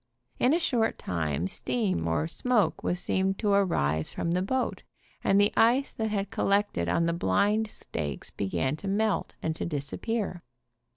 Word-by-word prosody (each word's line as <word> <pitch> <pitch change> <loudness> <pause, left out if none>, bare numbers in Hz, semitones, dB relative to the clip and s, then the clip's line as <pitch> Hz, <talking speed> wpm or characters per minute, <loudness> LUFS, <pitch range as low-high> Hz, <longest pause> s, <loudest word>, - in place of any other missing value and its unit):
In 250 - +4
a - - +4
short 240 -9 +1
time 80 -2 -2
steam 185 - -1
or 80 -2 +1
smoke 235 - +1
was 175 - 0
seen 190 +1 +1
to 205 0 0
arise 80 - +2
from 170 - -2
the 180 +1 +1
boat, 255 +7 -1 0.4
and 195 - +4
the 205 +1 +4
ice 245 +5 +3
that 220 -1 -2
had 205 -1 -2
col 225 - -1
lected 200 - +1
on 170 - +2
the 170 - +1
blind 205 - +2
stakes 75 - -5
began 130 +8 -1
to 195 - -7
melt 210 +2 0
and 160 0 -1
to - - -4
dis 145 -4 -2
6 - - -9
7 - - -5
appear. 215 -6 -2
195 Hz, 185 wpm, -28 LUFS, -, 0.4 s, In